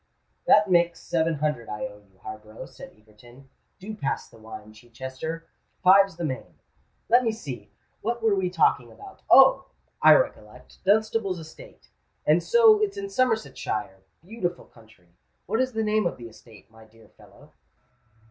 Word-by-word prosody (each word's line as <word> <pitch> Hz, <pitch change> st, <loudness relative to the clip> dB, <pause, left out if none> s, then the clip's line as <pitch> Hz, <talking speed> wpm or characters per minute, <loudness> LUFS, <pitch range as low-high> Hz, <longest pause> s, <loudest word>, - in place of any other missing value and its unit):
"That 210 Hz, 0 st, +6 dB
makes 170 Hz, -2 st, +2 dB
seven 165 Hz, -1 st, -1 dB
hundred 150 Hz, -6 st, -2 dB
I 105 Hz, 0 st, -4 dB
owe 105 Hz, -, -10 dB
you, 100 Hz, -2 st, -28 dB
Harborough," 110 Hz, 0 st, -9 dB
said -, -, -13 dB
Egerton. 120 Hz, +5 st, -19 dB, 0.3 s
"Do 200 Hz, +3 st, -8 dB
pass 170 Hz, -10 st, -3 dB
the -, -, -18 dB
wine, 110 Hz, -1 st, -11 dB
Chichester. 130 Hz, +8 st, -7 dB, 0.4 s
Five's 195 Hz, 0 st, +6 dB
the 170 Hz, 0 st, -4 dB
main. 130 Hz, -4 st, -6 dB, 0.5 s
Let 245 Hz, +2 st, +4 dB
me 225 Hz, -, +1 dB
see—what 215 Hz, -, -7 dB
were 220 Hz, -2 st, +3 dB
we 190 Hz, -2 st, 0 dB
talking 150 Hz, -8 st, +1 dB
about? 395 Hz, -1 st, -14 dB
Oh! -, -, +7 dB, 0.4 s
I -, -, +8 dB
recollect—Dunstable's 215 Hz, -, -1 dB
estate. 160 Hz, -1 st, -14 dB, 0.4 s
And 155 Hz, +3 st, +4 dB
so 445 Hz, -, +5 dB
it's 410 Hz, -1 st, -1 dB
in 395 Hz, 0 st, -5 dB
Somersetshire? 220 Hz, -, -2 dB, 0.3 s
Beautiful 185 Hz, -4 st, -5 dB
county! 110 Hz, -7 st, -21 dB, 0.3 s
What 220 Hz, +4 st, -1 dB
is 260 Hz, -1 st, -1 dB
the 220 Hz, 0 st, -1 dB
name 215 Hz, -2 st, +1 dB
of -, -, -5 dB
the 120 Hz, -1 st, -10 dB
estate, 110 Hz, -1 st, -18 dB
my 110 Hz, 0 st, -17 dB
dear 110 Hz, 0 st, -21 dB
fellow?" -, -, -20 dB
165 Hz, 150 wpm, -25 LUFS, -, 0.5 s, I